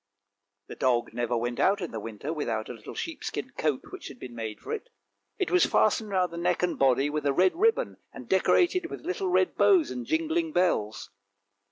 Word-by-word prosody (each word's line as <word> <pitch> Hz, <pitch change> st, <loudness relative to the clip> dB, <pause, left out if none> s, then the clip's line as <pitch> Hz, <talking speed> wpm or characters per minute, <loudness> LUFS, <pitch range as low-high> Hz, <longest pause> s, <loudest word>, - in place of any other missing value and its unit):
" 100 Hz, 0 st, -57 dB
The -, -, -7 dB
dog 120 Hz, -3 st, +1 dB
never 120 Hz, 0 st, -1 dB
went 120 Hz, +1 st, -2 dB
out 200 Hz, +2 st, +3 dB
in 175 Hz, -4 st, -4 dB
the 110 Hz, -, -4 dB
winter 115 Hz, +8 st, -5 dB
without 115 Hz, -8 st, -2 dB
a -, -, -4 dB
little 115 Hz, -, -10 dB
sheep 330 Hz, -3 st, -5 dB
skin 255 Hz, -, -4 dB
coat 150 Hz, -4 st, -1 dB
which -, -, -8 dB
had -, -, -10 dB
been 125 Hz, -2 st, -9 dB
made 110 Hz, -2 st, -5 dB
for -, -, -8 dB
it. 455 Hz, +2 st, -5 dB, 0.5 s
It 375 Hz, -, -1 dB
was 360 Hz, -, +5 dB
fastened 215 Hz, 0 st, +2 dB
round 185 Hz, -3 st, 0 dB
the -, -, -6 dB
neck 170 Hz, +1 st, 0 dB
and 180 Hz, -, 0 dB
body 135 Hz, +1 st, +4 dB
with 150 Hz, -1 st, -2 dB
a 140 Hz, -, +2 dB
red 185 Hz, +6 st, +3 dB
ribbon, 450 Hz, +6 st, +2 dB
and -, -, -10 dB
decorated 355 Hz, -1 st, +3 dB
with -, -, -8 dB
little 375 Hz, +1 st, -1 dB
red 370 Hz, 0 st, +2 dB
bows 365 Hz, -6 st, +4 dB
and 245 Hz, -, -5 dB
jingling 320 Hz, 0 st, 0 dB
bells. 110 Hz, -, 0 dB
175 Hz, 215 wpm, -28 LUFS, -, 0.5 s, was